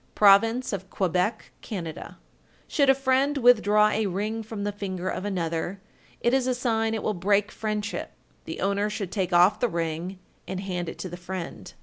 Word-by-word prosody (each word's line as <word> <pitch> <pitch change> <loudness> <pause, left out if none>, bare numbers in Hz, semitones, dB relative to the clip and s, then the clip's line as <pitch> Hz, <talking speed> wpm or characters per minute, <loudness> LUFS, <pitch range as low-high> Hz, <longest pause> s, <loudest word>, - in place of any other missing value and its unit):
Province 225 +5 +5
of 190 -1 -5
Quebec, 185 +3 -1
Can. 200 -6 -5
1393. 160 -1 -8 0.5
Should 280 -4 +2
a 270 - +7
friend 270 +2 +2
withdraw 215 -4 +5
a 215 0 0
ring 210 +4 -2
from 220 -2 -6
the 205 - -1
finger 190 -3 -4
of 190 - -4
another, 175 -1 -2 0.4
it 240 - +2
is 265 -1 +2
a 255 - +1
sign 225 -2 0
it 220 - -4
will 215 - 0
break 200 +3 +1
friendship. 210 -1 -3 0.3
The - - -6
owner 200 +1 +1
should 200 -3 -4
take 190 -3 -1
off 180 +4 +5
the 245 - +1
ring 170 +2 -3 0.3
and 190 0 -4
hand 180 -3 -3
it - - -8
to - - -5
the 175 - -7
friend. 180 0 -6
205 Hz, 190 wpm, -26 LUFS, 185-225 Hz, 0.5 s, a